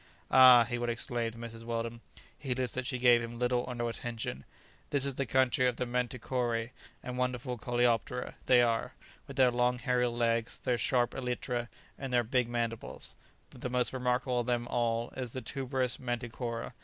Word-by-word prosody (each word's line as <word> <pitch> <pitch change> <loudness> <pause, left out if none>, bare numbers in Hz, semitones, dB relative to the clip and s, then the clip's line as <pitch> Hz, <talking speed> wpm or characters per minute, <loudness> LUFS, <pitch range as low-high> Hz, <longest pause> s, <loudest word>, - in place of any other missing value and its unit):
"Ah," 130 -2 +9
he 120 +1 -3
would 120 0 -1
exclaim 120 0 -1
to 115 - -13
Mrs. 115 -1 -8
Weldon, 115 0 -3 0.3
heedless 130 -3 -2
that 130 -1 -3
she 130 - -2
gave 120 -1 +5
him 115 0 -6
little 125 0 +1
or 125 - -4
no 120 0 -1
attention, 115 - -5 0.4
"this 140 -1 +2
is 140 - 0
the 135 0 -2
country 130 +1 +3
of 125 - 0
the 125 - -2
manticoræ, 120 -1 -1 0.3
and 125 0 -5
wonderful 125 0 -1
coleoptera 120 +1 0
they 125 -1 +6
are, 115 -1 0 0.3
with - - -8
their 130 -2 +5
long 125 +1 +2
hairy 125 -1 +1
legs, 115 -1 0
their 125 -2 -1
sharp 120 -2 +2
elytra 125 -1 -2 0.3
and 135 -2 -4
their 120 -1 +3
big 125 +1 +1
mandibles; 115 -1 -3 0.4
the 125 0 -5
most 125 0 +1
remarkable 125 0 0
of 120 - -2
them 120 -1 0
all 115 -1 0
is 125 -3 -5
the 130 - -4
tuberous 130 -2 -1
manticora. 120 -1 -4
120 Hz, 180 wpm, -31 LUFS, 120-125 Hz, 0.4 s, Ah